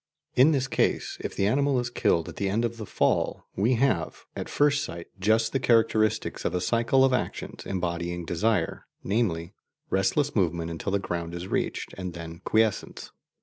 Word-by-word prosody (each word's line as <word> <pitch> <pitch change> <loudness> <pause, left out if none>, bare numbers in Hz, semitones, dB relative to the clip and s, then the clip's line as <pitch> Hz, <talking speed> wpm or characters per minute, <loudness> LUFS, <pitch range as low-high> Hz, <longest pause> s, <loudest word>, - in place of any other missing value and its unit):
In 135 +5 +6
this 135 -3 +1
case, 130 - 0
if - - -5
the 100 - +1
animal 135 +4 +2
is 120 -1 -3
killed 85 -7 +1
at - - -9
the 100 - 0
end 110 +4 +1
of 115 0 -3
the 110 -3 -7
fall, - - 0
we 115 +6 +2
have, 115 -8 0
at - - -5
first 145 -1 +2
sight, 85 0 -6
just 110 +3 +2
the 135 - +2
characteristics 110 -3 +2
of - - -1
a - - +1
cycle 120 +7 +3
of 130 - +2
actions 125 - -3
embodying 85 -2 -2
desire, 105 +6 0 0.2
namely, 95 -5 0 0.4
restless 140 +10 +1
movement 85 -4 0
until 85 +4 -3
the 100 - +3
ground 85 -3 -4
is 85 +1 -5
reached, - - -2
and 90 -2 -5
then 85 0 -8
quiescence. 110 -2 0
105 Hz, 180 wpm, -27 LUFS, 85-120 Hz, 0.4 s, In